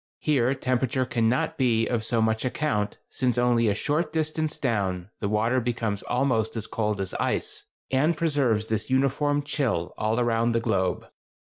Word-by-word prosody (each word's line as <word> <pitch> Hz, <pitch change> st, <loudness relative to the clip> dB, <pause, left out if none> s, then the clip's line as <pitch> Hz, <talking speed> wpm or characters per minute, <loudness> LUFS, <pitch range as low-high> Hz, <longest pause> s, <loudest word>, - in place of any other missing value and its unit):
Here 135 Hz, -3 st, +1 dB
temperature 130 Hz, 0 st, 0 dB
cannot 120 Hz, +2 st, 0 dB
be 115 Hz, -3 st, +3 dB
of 115 Hz, -2 st, -1 dB
so 115 Hz, 0 st, +1 dB
much 110 Hz, 0 st, +1 dB
account, 120 Hz, -5 st, -1 dB
since 125 Hz, -1 st, 0 dB
only 120 Hz, -1 st, +3 dB
a 100 Hz, -, +2 dB
short 150 Hz, +7 st, 0 dB
distance 155 Hz, -1 st, -1 dB
down, 100 Hz, -6 st, -1 dB
the 100 Hz, -, -2 dB
water 115 Hz, +4 st, +2 dB
becomes 115 Hz, -4 st, -2 dB
almost 125 Hz, -4 st, 0 dB
as 110 Hz, -2 st, -3 dB
cold 105 Hz, -2 st, -2 dB
as 95 Hz, -2 st, -3 dB
ice, -, -, -1 dB, 0.3 s
and 150 Hz, +5 st, +2 dB
preserves 140 Hz, -9 st, +1 dB
this 110 Hz, +1 st, -2 dB
uniform 140 Hz, +2 st, +1 dB
chill 115 Hz, -, -1 dB
all 110 Hz, +2 st, +1 dB
around 115 Hz, -1 st, +2 dB
the 115 Hz, -, +2 dB
globe. 95 Hz, -5 st, 0 dB
120 Hz, 160 wpm, -26 LUFS, 110-135 Hz, 0.3 s, be